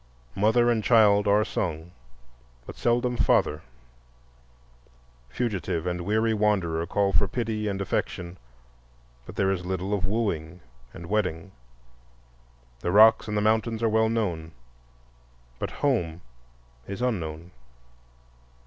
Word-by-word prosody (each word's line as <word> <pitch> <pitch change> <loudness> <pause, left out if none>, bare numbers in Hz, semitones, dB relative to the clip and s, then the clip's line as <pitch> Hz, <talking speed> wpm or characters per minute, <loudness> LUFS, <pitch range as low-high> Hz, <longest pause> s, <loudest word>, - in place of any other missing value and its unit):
Mother 120 +4 +3
and 110 -2 0
child 105 -3 +4
are 105 +1 +3
sung, 80 0 -4 0.7
but - - -9
seldom 120 +1 0
father; 75 -7 +2 1.7
fugitive 90 - -2
and 90 0 -2
weary 110 +4 +1
wanderer 95 -6 0
call 100 0 0
for 100 - +3
pity 110 0 -3
and 100 -1 -2
affection, 90 -2 -3 0.9
but - - -10
there 95 0 +1
is 90 -2 -2
little 95 +2 -3
of 95 -3 0
wooing 90 -6 -2 0.3
and 85 - -10
wedding; 95 -2 -2 1.3
the 85 - -2
rocks 110 +4 +6
and 105 0 -2
the - - +1
mountains 110 +1 +1
are 115 - +3
well 110 0 +2
known, 85 -8 -2 1.1
but - - -3
home 90 - -1 0.7
is 100 +5 -5
unknown. 85 -8 -3
100 Hz, 120 wpm, -26 LUFS, 85-110 Hz, 1.7 s, rocks